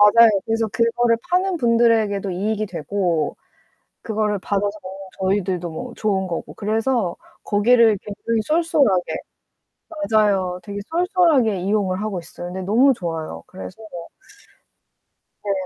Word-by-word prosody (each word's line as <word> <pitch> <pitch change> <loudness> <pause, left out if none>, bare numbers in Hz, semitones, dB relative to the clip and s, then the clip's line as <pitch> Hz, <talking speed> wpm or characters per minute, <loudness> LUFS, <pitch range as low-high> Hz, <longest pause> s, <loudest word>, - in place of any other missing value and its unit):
맞아요. 230 0 +9 0.2
그래서 225 0 0
그거를 230 +2 +2
파는 365 0 +1
분들에게도 230 -5 +2
이익이 210 +4 -1
되고 175 -2 -1 0.7
그거를 210 -2 -1
받아서 205 +2 -1
먹는 190 +1 -9
저희들도 190 -2 0
뭐 235 +10 -7
좋은 195 -3 0
거고 170 -2 -5
그래서 220 -2 0 0.3
거기를 225 +1 +4
굉장히 220 +2 -2
쏠쏠하게 305 - +2 1.0
맞아요. 195 -5 +2
되게 200 +3 -6
쏠쏠하게 330 - +2
이용을 195 -1 0
하고 210 -4 -2
있어요. 175 +1 -8
근데 190 - -5
너무 235 +9 +4
좋아요. 160 - -5
그래서 95 - -10 1.6
네. 205 - -2
210 Hz, 305 characters per minute, -21 LUFS, 190-230 Hz, 1.6 s, 맞아요